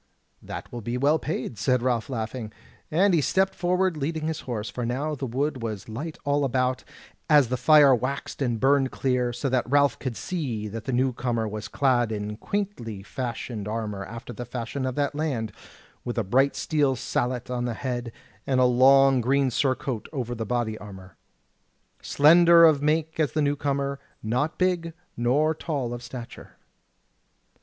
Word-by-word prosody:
"That - - -8
will 120 - -6
be 120 +3 -3
well 145 +5 +3
paid," 130 -8 -4
said 125 +4 +1
Ralph 125 0 0
laughing, 115 -2 -4 0.4
and 185 +5 +3
he 165 - +4
stepped 190 +6 +1
forward 180 0 +1
leading 155 +2 -3
his 160 -1 -2
horse, 115 -4 -4
for 125 - -5
now 135 +6 -2
the 135 -2 -4
wood 135 +2 -2
was 110 -4 -5
light 145 +9 -6
all 145 0 +1
about, 130 -1 0 0.5
as 145 -6 +5
the 125 - 0
fire 140 +2 +6
waxed 130 +4 -3
and 120 -4 0
burned 135 +1 +3
clear; 125 -2 0
so 120 +4 -3
that 130 -1 0
Ralph 140 0 +3
could 130 -4 -4
see 125 -12 -3
that 110 +1 -7
the - - -2
new 130 +1 +1
comer 120 -2 -1
was 105 -1 -5
clad 120 0 +1
in 105 0 -4
quaintly 120 - -4
fashioned 115 -2 -5
armour 105 -3 -3
after 115 +5 -8
the 120 - -6
fashion 125 +2 -4
of 130 - -3
that 145 0 0
land, 135 -8 -2 0.5
with 120 - -4
a 115 - +1
bright 135 +8 +2
steel 145 -4 +1
sallet 125 +1 -2
on 120 -1 -1
the 120 -2 -2
head, 120 -1 -4 0.4
and 130 -2 +2
a 130 - +5
long 135 +1 +5
green 135 +2 +2
surcoat 130 -3 -1
over 125 -5 -3
the 115 -2 -4
body 120 -2 -1
armour. 95 -2 -11 0.9
Slender 170 +3 +6
of 155 -3 +4
make 155 +2 0
was 155 -3 +1
the 155 - +1
new 145 0 +1
comer, 140 -1 -2 0.2
not 125 +9 -1
big 175 -3 0 0.2
nor 140 +7 +2
tall 140 -6 -3
of 120 - -6
stature. 120 -1 -9
130 Hz, 175 wpm, -25 LUFS, 120-145 Hz, 0.9 s, fire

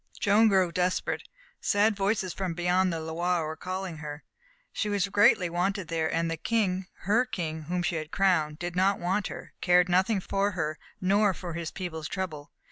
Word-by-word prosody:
Joan 210 +2 +5
grew 190 -4 +3
desperate. 180 +1 -1 0.3
Sad 210 +1 +2
voices 195 -2 0
from 185 -4 -3
beyond 180 +2 +2
the 165 - -2
Loire 165 +1 -1
were 155 +1 -4
calling 185 0 -5
her. 150 0 -7 0.5
She 210 - -1
was 200 -2 +1
greatly 205 -3 +4
wanted 180 +2 -1
there, 160 -1 0
and 165 +1 0
the 165 - -2
King 190 -2 0
her 215 +6 +3
King 165 -10 -4
whom 175 +2 -1
she 170 - 0
had 155 -1 -5
crowned 160 -6 +2
did 175 +1 -5
not 190 +2 +3
want 190 +3 -1
her, - - -9
cared 180 0 +4
nothing 190 +4 +3
for 200 +2 0
her 155 -4 -2 0.2
nor 200 +1 +3
for 175 -3 -6
his 165 -1 -4
people's 160 -4 -5
trouble. 160 -6 -5
180 Hz, 185 wpm, -28 LUFS, 165-195 Hz, 0.5 s, Joan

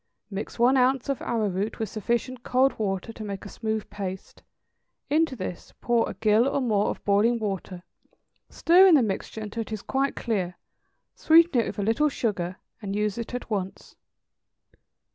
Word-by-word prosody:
= - - -57
Mix 200 +2 -5
one 245 +3 +4
ounce 260 +1 +2
of 275 - -1
arrowroot 210 -2 -1
with 220 - -2
sufficient 235 +4 -2
cold 260 +1 +2
water 195 +1 -2
to 220 - -8
make 200 -1 -6
a - - -7
smooth 220 -1 -3
paste; 190 -2 -6 0.7
into 315 -2 +2
this 185 -5 -7
pour 240 -1 +1
a - - -7
gill 220 +3 +3
or 275 - 0
more 215 -6 +1
of - - -6
boiling 210 +4 +3
water, 195 -4 -4 0.7
stirring 360 +1 +6
the 270 - +5
mixture 215 +1 -4
until 215 +2 -4
it 225 - -8
is 215 -2 -5
quite 270 +1 -1
clear; 190 -7 -2 0.6
sweeten 325 -5 +5
it - - -3
with - - -6
a 205 - -1
little 230 +9 +2
sugar, 190 -9 -2 0.3
and 200 -1 -4
use 210 +1 -1
it 235 +1 -5
at 245 - -6
once. 195 -2 -4
220 Hz, 175 wpm, -26 LUFS, 200-255 Hz, 0.7 s, stirring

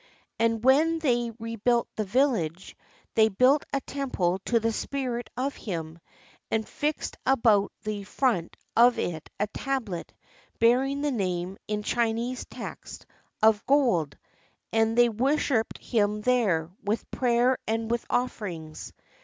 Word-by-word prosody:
And 230 0 +1
when 310 +5 +5
they 240 -7 +1
rebuilt 230 +1 0
the 215 - -1
village, 200 - 0 0.4
they 220 0 +5
built 255 +8 +3
a 275 - 0
temple 200 -12 -1
to 235 - +2
the 225 +1 0
spirit 245 0 -3
of 270 +3 -1
him, 165 -5 -5 0.5
and 220 -1 -1
fixed 300 +1 -3
about 225 -6 +3
the 210 -1 -3
front 200 -5 -1 0.2
of 240 +1 +6
it 160 -7 -3
a 210 - +2
tablet 225 -5 -4 0.5
bearing 265 +5 +3
his 295 - +1
name 185 -5 -2
in 210 0 -2
Chinese 235 +2 -1
text - - -8 0.4
of 220 -1 +5
gold; 235 - +2 0.6
and 225 +1 +2
they 240 0 +7
worshiped 245 0 0
him 210 -2 0
there, 205 -10 +1
with 210 +3 -2
prayer 245 0 +2
and 225 +1 -1
with 235 -1 0
offerings. 180 -11 -3
230 Hz, 130 wpm, -27 LUFS, 205-255 Hz, 0.6 s, they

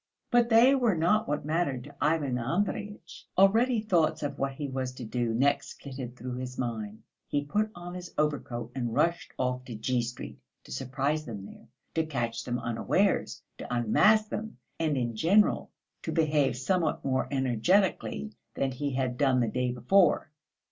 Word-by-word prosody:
But 240 -1 +4
they 235 +4 +7
were 245 -7 +2
not 195 +7 +2
what 145 0 -2
mattered 150 -5 0
to 145 +1 -13
Ivan 145 -4 +1
Andreyitch. 185 - -3
Already 225 +6 +5
thoughts 175 -9 +1
of 145 - -3
what 135 0 -1
he 145 +1 -4
was 130 -1 -3
to 125 -2 -7
do 120 +1 -1
next 135 +5 0
flitted 130 -3 -7
through 125 0 -6
his 125 0 -6
mind. 110 -3 -4 0.2
He 145 0 -1
put 210 +9 0
on 175 0 -8
his 180 -1 -7
overcoat 125 -6 -1
and 120 -4 -3
rushed 170 +1 +1
off 125 0 -1
to 120 - -7
G. 120 +3 0
Street 120 +1 -7 0.2
to - - -14
surprise 140 - -1
them 105 -5 -7
there, - - -13 0.3
to 160 - +1
catch 120 -6 -3
them 120 0 -1
unawares, 120 -2 0 0.2
to - - -7
unmask 210 - +4
them, 220 +1 -5 0.2
and 155 -3 +1
in 120 -2 -1
general 195 - +3 0.3
to - - -4
behave 150 -6 +2
somewhat 160 +4 0
more 130 -1 +1
energetically 130 - +1 0.2
than 135 -1 0
he 140 +2 -3
had 130 -1 -1
done 135 -3 +3
the 120 - +2
day 125 +3 -1
before. 155 - +3
135 Hz, 170 wpm, -29 LUFS, 125-170 Hz, 0.3 s, they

